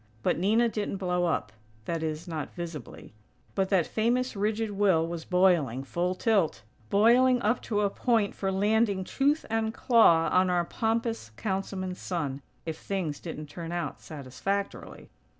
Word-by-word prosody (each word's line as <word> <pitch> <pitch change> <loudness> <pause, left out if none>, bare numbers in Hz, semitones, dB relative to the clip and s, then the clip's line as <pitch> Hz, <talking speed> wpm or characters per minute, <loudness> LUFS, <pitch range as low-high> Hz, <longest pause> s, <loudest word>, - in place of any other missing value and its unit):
But - - +1
Nina 220 +6 +3
didn't 210 -3 -3
blow 180 -2 0
up, 165 - -1 0.3
that 165 -1 -2
is, 160 +2 -3
not 160 -3 -5
visibly; 170 -9 -8 0.4
but 190 -1 0
that 185 -5 +3
famous 240 +3 0
rigid 215 +2 -1
will 195 -5 +3
was 165 -1 -5
boiling, 175 -9 +2
full 175 +6 -1
tilt; 185 - +1 0.3
boiling 245 +5 +5
up 220 +4 +1
to 210 -2 -1
a 200 - +2
point 225 -4 +1
for 195 -1 -2
landing, 205 0 +2
"tooth 285 +9 +1
and 225 0 0
claw" 170 -10 +5
on 185 0 +4
our 175 -1 +1
pompous 225 - -1
Councilman's 190 -2 -3
son, 145 -7 -3 0.2
if 160 -1 -4
things 180 -7 -3
didn't 155 -3 -6
turn 165 +3 -7
out 175 -5 -4
satisfactorily. 160 +8 -5
190 Hz, 150 wpm, -28 LUFS, 165-220 Hz, 0.4 s, boiling